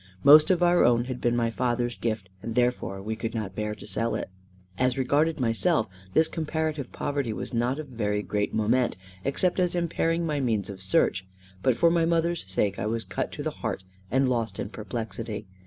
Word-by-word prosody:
Most 150 +2 +8
of 180 -2 +3
our 175 0 +5
own 120 0 +4
had 125 -1 -5
been 120 0 +2
my 115 -1 +1
father's 120 0 -1
gift, 110 -4 -2
and 115 +2 -5
therefore 120 -6 0
we 110 +2 -3
could 115 +1 -4
not 105 -4 -3
bear 105 +1 -3
to 105 - -11
sell 115 +3 -1
it. - - -4 0.5
As 125 0 +2
regarded 145 +5 +2
myself, 115 +2 +2 0.3
this 160 - +6
comparative 155 -4 -2
poverty 140 -5 -2
was 110 - -5
not 120 +3 +1
of 155 - -5
very 105 -4 -1
great 105 0 -1
moment, 115 +3 +1 0.3
except 180 +7 +1
as 180 -1 +1
impairing 170 0 0
my 150 -3 -1
means 110 -6 0
of 95 -1 -10
search; 95 0 +2 0.3
but 130 -3 +2
for 170 +6 +5
my 170 -1 +3
mother's 170 0 +1
sake 100 +1 0
I 100 - -1
was 115 +1 -1
cut 135 - -3
to 145 - -5
the 155 - -1
heart, 110 -5 -3 0.3
and 130 +1 +2
lost 115 -5 -1
in - - -3
perplexity. 110 -1 -5
120 Hz, 200 wpm, -27 LUFS, 110-150 Hz, 0.5 s, Most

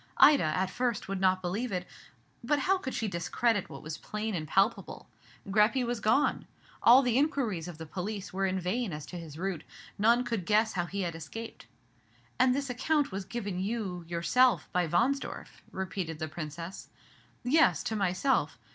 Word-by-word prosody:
Ida, 290 -7 +7
at 180 +5 0
first, 240 0 -1
would 195 -1 -3
not 185 0 +3
believe 205 +7 -2
it; 180 -1 -2 0.6
but 295 +5 +2
how 375 +7 +2
could 260 -7 -5
she 225 - -1
discredit 205 +4 0
what - - -9
was 155 +1 -6
plain 215 +1 -4
and 155 -4 -3
palpable? 195 +8 0 0.4
Greppi 215 +6 +3
was 240 -1 -2
gone. 220 +7 +2 0.3
All 255 +3 +8
the 245 0 +2
inquiries 245 - 0
of 175 -3 -8
the 160 - -7
police 195 +4 -5
were 195 +1 +1
in 190 0 -1
vain 190 +2 -2
as 150 -1 -6
to 180 - -7
his 155 -3 -9
route; 180 -3 -3 0.4
none 235 +4 +4
could 230 -8 -3
guess 215 +1 +3
how 175 -2 -1
he 200 +2 -3
had 175 -2 -2
escaped." 195 +8 -8 0.7
"And 255 0 +4
this 280 0 -2
account 280 +3 0
was 190 0 -4
given 205 -5 -4
you 210 +5 -1
you 180 -6 -5
yourself 205 +10 +3
by 180 -1 +1
Wahnsdorf?" 245 - -1
repeated 185 -3 -4
the 155 0 -3
Princess. 160 +3 -7 0.5
"Yes, 305 +6 +4
to 220 - -2
myself. 185 - +1
195 Hz, 180 wpm, -30 LUFS, 175-240 Hz, 0.7 s, All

